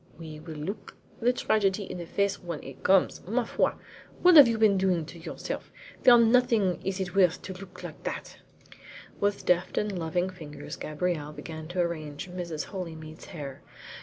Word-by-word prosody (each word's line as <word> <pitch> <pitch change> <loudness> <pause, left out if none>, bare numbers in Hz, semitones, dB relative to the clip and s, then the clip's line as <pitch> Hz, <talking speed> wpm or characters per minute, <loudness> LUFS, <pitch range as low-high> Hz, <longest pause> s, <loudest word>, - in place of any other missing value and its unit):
"We 155 -2 -8
will 160 0 -8
look 155 +8 -6 0.2
the 240 +2 +3
tragedy 205 -4 +1
in 185 - -6
the 170 - -6
face 200 +2 0
when 170 -4 -5
it 135 -1 -10
comes. 190 0 +3
Ma 235 +5 +1
foi! - - +1 0.5
What 360 -1 +8
have 290 -5 +11
you 230 -1 +1
been 215 -2 +5
doing 185 -4 +1
to 170 +2 -11
yourself? 160 - -6 0.3
For 245 -1 +9
nothing 230 -6 +3
is 190 0 -2
it 185 -2 -3
worth 180 -3 +3
to 190 - -6
look 195 +1 -11
like - - -8
that." - - -5 0.8
With 205 0 0
deft 180 +1 +2
and 210 -2 0
loving 175 +3 -1
fingers 150 -5 -8
Gabrielle 155 -1 -2
began 160 0 -7
to 175 +1 -1
arrange 155 -1 -4
Mrs. 170 -4 -4
Holymead's 160 -4 -7
hair. 145 -7 -8
180 Hz, 175 wpm, -28 LUFS, 160-200 Hz, 0.8 s, have